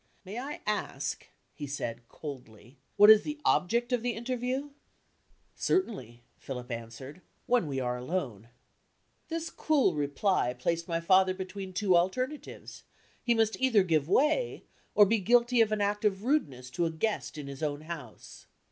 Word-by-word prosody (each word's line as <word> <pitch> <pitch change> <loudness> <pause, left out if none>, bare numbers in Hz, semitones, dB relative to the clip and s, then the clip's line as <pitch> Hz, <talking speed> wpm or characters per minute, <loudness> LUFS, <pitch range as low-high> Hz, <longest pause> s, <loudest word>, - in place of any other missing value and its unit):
"May 205 +6 -5
I 280 +4 -6
ask," 150 -9 -3 0.3
he 145 - -6
said, 120 -4 -5
coldly, 125 -3 -10 0.2
"what 210 +1 +10
is 215 -1 +8
the 300 0 -5
object 235 +6 +2
of 245 - +1
the 245 0 -1
interview?" 255 +4 -3 0.8
"Certainly," 130 - -1 0.2
Philip 125 -2 -7
answered, 115 +8 -7 0.2
"when 245 -9 +2
we 135 -2 -2
are 125 -1 -1
alone." 125 - -4 0.8
This 330 0 -3
cool 290 - +2
reply 145 -1 0
placed 170 +6 -1
my 165 -1 -1
father 185 +2 +4
between 190 0 -6
two 185 0 +2
alternatives; 255 +12 -2 0.4
he 240 -1 +2
must 225 +2 +1
either 235 -7 +4
give 160 -4 +1
way, 305 - +2 0.3
or 205 - +8
be 220 +3 +2
guilty 240 +3 +4
of 220 -1 +3
an 215 -1 0
act 205 +1 0
of 200 -2 +1
rudeness 140 - -1
to 170 +6 0
a - - -3
guest 165 0 -2
in 150 - -6
his 140 0 -8
own 145 -1 -2
house. 155 -8 -9
185 Hz, 155 wpm, -30 LUFS, 140-235 Hz, 0.8 s, what